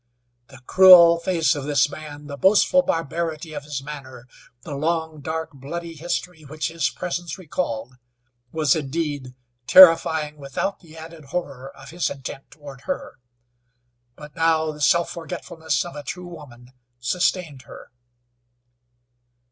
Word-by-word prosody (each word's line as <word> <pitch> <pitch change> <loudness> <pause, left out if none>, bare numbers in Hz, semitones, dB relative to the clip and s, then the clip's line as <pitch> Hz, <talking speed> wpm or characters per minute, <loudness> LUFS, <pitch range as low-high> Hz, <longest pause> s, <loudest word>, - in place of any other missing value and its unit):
The 135 -1 -16
cruel 175 -2 +8
face 170 -2 +1
of 145 -3 -5
this 145 -1 +2
man, 145 0 -10
the 140 -1 -7
boastful 205 - +4
barbarity 165 - -3
of 145 -1 -7
his 145 -3 -5
manner, 135 -4 -9 0.4
the 150 - -7
long, 160 +1 -2
dark, 160 +3 -4
bloody 165 +5 -7
history 175 +1 -4
which 155 +2 -4
his 165 0 -1
presence 175 -2 -5
recalled, 130 -9 -4 0.5
was, 155 -3 +2
indeed, 145 -3 -4 0.3
terrifying 160 -4 +6
without 140 +8 -4
the 160 -2 -16
added 160 -1 -11
horror 135 -4 -5
of 135 +1 -13
his 175 +1 -1
intent 135 0 -8
toward 145 -3 -12
her, - - -5 1.0
but 150 +1 -13
now 160 -1 +1
the 150 0 -11
self 170 +4 +3
forgetfulness 165 -1 -4
of 175 - -9
a 145 - -6
true 180 +5 -7
woman 130 -8 -13 0.3
sustained 165 +1 -1
her. - - -12
155 Hz, 135 wpm, -22 LUFS, 140-170 Hz, 1.0 s, cruel